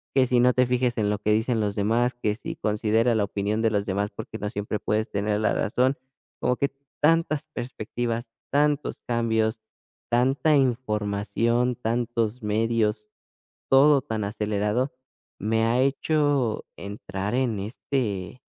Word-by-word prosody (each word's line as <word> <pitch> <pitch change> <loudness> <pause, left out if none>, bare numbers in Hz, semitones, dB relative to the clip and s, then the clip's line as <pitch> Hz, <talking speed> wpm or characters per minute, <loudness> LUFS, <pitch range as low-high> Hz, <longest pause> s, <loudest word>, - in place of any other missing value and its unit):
que 130 -2 +5
si 125 0 +3
no 125 +1 +5
te 125 +1 +3
fijes 125 0 0
en 105 -2 +1
lo 105 -1 -1
que 105 +1 0
dicen 115 +2 +1
los 105 -2 -1
demás, 115 +5 +1
que 105 -3 -1
si 115 - -6
considera 110 +2 +1
la 110 - +2
opinión 105 +2 -1
de 115 - +3
los 100 -1 0
demás, 100 +1 -1
porque 105 +2 -7
no 105 - -2
siempre 105 +1 -3
puedes 110 +2 -1
tener 105 +1 0
la 110 - +2
razón, 130 +6 +1 0.4
como 125 - +1
que 140 - +1 0.3
tantas 155 -1 +2
perspectivas, 120 0 -4 0.2
tantos 145 +1 +1
cambios, 110 -1 0 0.5
tanta 135 +6 +3
información, 115 -1 +1
tantos 115 0 -1
medios, 105 0 0 0.6
todo 140 +1 +6
tan 110 -6 -3
acelerado, 105 +4 -1 0.5
me 110 +2 +1
ha 120 +2 +2
hecho 140 -3 +1
entrar 100 0 -5
en 125 -5 0
este, 105 -1 -3
115 Hz, 145 wpm, -25 LUFS, 105-125 Hz, 0.6 s, todo